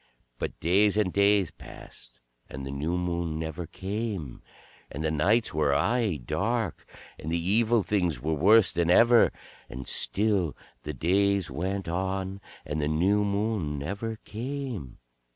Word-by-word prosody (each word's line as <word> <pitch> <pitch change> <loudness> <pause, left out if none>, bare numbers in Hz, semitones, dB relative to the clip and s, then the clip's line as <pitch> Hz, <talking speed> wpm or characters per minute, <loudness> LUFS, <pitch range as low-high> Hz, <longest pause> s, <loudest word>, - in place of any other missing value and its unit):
But - - -4
days 100 +5 +3
and 100 -4 +1
days 100 -3 +3
passed, - - -13 0.3
and 65 +1 -7
the 70 - -5
new 75 +6 -2
Moon 85 -2 -2
never 80 +1 -5
came, 95 - -5 0.5
and 75 - -5
the 80 - 0
nights 110 +10 +2
were 75 -2 +2
aye 110 - +1
dark, 100 - -2 0.3
and 80 - -5
the 85 - +1
Evil 110 +5 +2
Things 90 -6 0
were 80 +2 -1
worse 100 +7 +5
than 85 -1 0
ever. 115 +5 +6 0.4
And 65 0 -7
still 100 -6 +2 0.2
the 75 - -5
days 95 +2 +1
went 95 +6 -3
on, 95 +2 -3 0.2
and 75 +1 -3
the 75 - 0
new 95 +7 +2
Moon 100 -7 -1
never 100 +10 -4
came. 120 - -5
95 Hz, 145 wpm, -27 LUFS, 80-105 Hz, 0.5 s, ever